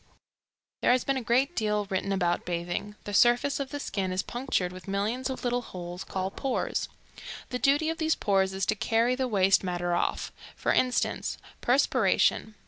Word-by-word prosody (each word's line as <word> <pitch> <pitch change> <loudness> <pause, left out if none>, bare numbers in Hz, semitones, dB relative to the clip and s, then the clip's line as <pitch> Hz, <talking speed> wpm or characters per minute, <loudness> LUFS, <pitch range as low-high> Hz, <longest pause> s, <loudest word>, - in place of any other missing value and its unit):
There - - +4
has 255 - +1
been 275 - 0
a - - -2
great 255 +8 +1
deal 210 -2 0
written 195 0 -2
about 175 -3 +1
bathing. 175 +4 -3
The 205 - -6
surface 240 +6 +4
of 275 -1 -3
the 290 - -5
skin 195 -8 -2
is 185 0 -1
punctured 240 -8 -1
with 185 +1 -11
millions 215 +7 -1
of 260 - -5
little 245 0 0
holes 180 -4 -7
called 190 0 -4
pores. 270 -2 -1 0.6
The 250 - -2
duty 290 +4 +3
of 325 - -6
these 315 0 +2
pores 195 -2 +1
is 195 - 0
to 215 - +1
carry 230 +3 +2
the 260 0 -1
waste 195 -4 +3
matter 175 -1 -1
off. 175 - -1 0.2
For - - 0
instance, 250 -1 0 0.2
perspiration. 245 -3 +2
215 Hz, 180 wpm, -28 LUFS, 190-255 Hz, 0.6 s, There